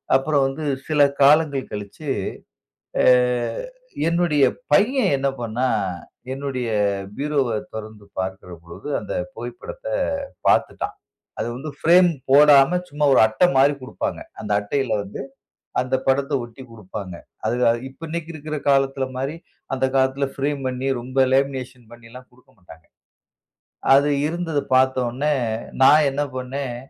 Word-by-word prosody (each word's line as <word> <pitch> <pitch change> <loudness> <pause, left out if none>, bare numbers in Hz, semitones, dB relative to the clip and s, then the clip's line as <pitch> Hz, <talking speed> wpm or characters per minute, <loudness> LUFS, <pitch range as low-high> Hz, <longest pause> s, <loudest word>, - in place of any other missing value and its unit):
அப்புறம் 140 +1 +2
வந்து 135 +4 -5 0.2
சில 150 -2 +2 0.2
காலங்கள் 145 -1 +4
கழிச்சு, 105 +8 -7 0.9
அ - - +2 1.0
என்னுடைய 170 -4 +2 0.3
பையன் 250 +6 +4
என்ன 135 0 0
பண்ணான்? 115 -3 0 0.4
என்னுடைய 135 -3 -3 0.5
பீரோவ 145 -3 0 0.3
தொறந்து 110 -1 -8
பாக்கிற 95 0 -4
பொழுது, 85 +12 -10
அந்த - - -6 0.2
புகைப்படத்த - - -8 0.6
பாத்துட்டான். - - +1 0.4
அது - - -1
வந்து 140 +5 -6
ஃபிரேம் 175 +2 +6 0.2
போடாம 145 +3 +7
சும்மா 150 +1 0
ஒரு - - +5
அட்டை 110 +11 +3
மாரி 140 +2 +5
குடுப்பாங்க. 295 - -4 0.2
அந்த 105 - -5
அட்டையில 130 +6 -2
வந்து 100 +5 -7 0.6
அந்த 130 +1 -2
படத்தை 140 +2 +1
ஒட்டிக் 120 +2 -11
குடுப்பாங்க. 100 -3 -8 0.3
அது 115 +3 0
அ - - +5 0.2
இப்ப 130 - -20
இன்னைக்கு 165 0 -5
இருக்கிற 155 0 -5
காலத்தில 135 -1 +2
மாரி, 135 +4 -2 0.4
அந்த 135 - -1
காலத்தில 135 +1 +2
ஃபிரேம் 140 0 -2
பண்ணி, 130 +1 -4
ரொம்ப 130 +2 -5
லேமினேஷன் 130 -2 -1 0.5
குடுக்க 125 +1 -25
மாட்டாங்க. 80 -3 -16 1.1
அது 140 +2 +4 0.2
இருந்தத 165 -3 -2
பாத்த 130 0 +4
உடனே, 140 +6 -1 0.5
நான் 150 +3 +7
என்ன 145 +2 -1
பண்ணேன்? 130 0 -4
135 Hz, 125 wpm, -22 LUFS, 125-150 Hz, 1.1 s, போடாம